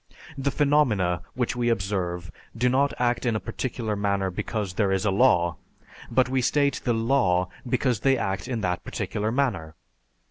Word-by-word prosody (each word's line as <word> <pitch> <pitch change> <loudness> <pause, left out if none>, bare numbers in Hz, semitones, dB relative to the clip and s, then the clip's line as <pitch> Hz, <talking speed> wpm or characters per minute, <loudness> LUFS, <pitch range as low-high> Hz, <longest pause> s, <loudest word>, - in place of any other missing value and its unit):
The 140 0 -1
phenomena 125 - +2
which 125 -1 -1
we 120 -1 +1
observe 95 -5 -2 0.3
do 125 +2 +2
not 140 +3 +2
act 120 -1 +1
in 120 -3 +1
a - - 0
particular 115 -4 -3
manner 100 -2 0
because 100 +1 -3
there 100 0 +1
is 95 +2 0
a 100 - +3
law; 90 -6 +3 0.5
but 130 -1 +3
we 130 0 0
state 140 +2 +1
the 120 - +1
"law" 115 -7 +2 0.2
because 125 -2 +1
they 135 +2 +3
act 95 -1 -2
in 120 -3 -2
that 90 -2 -1
particular 105 +1 -3
manner. 100 - -1
115 Hz, 170 wpm, -25 LUFS, 95-130 Hz, 0.5 s, a